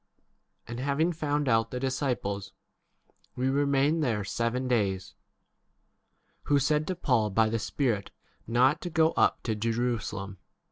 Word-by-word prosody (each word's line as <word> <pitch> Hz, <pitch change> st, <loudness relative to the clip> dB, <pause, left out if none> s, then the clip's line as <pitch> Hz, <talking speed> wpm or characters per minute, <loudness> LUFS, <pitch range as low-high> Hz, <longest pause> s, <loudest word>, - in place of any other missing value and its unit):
And 120 Hz, +1 st, -6 dB
having 140 Hz, +6 st, +1 dB
found 145 Hz, -2 st, -1 dB
out 115 Hz, -2 st, +2 dB
the 125 Hz, -, -4 dB
disciples, 125 Hz, -8 st, -2 dB, 0.8 s
we 130 Hz, +1 st, 0 dB
remained 140 Hz, +3 st, +2 dB
there 110 Hz, -6 st, 0 dB
seven 115 Hz, +5 st, -1 dB
days; 100 Hz, -6 st, 0 dB, 1.3 s
who 145 Hz, -, +3 dB
said 150 Hz, +2 st, +1 dB
to 185 Hz, -, -1 dB
Paul 125 Hz, -10 st, +1 dB
by 110 Hz, +2 st, +2 dB
the 115 Hz, +1 st, -1 dB
Spirit 110 Hz, -4 st, -1 dB, 0.4 s
not 130 Hz, +7 st, +3 dB
to 175 Hz, -, -4 dB
go 160 Hz, -1 st, +3 dB
up -, -, +2 dB
to 110 Hz, -, -1 dB
Jerusalem. 110 Hz, -3 st, -2 dB
125 Hz, 135 wpm, -28 LUFS, 110-145 Hz, 1.3 s, who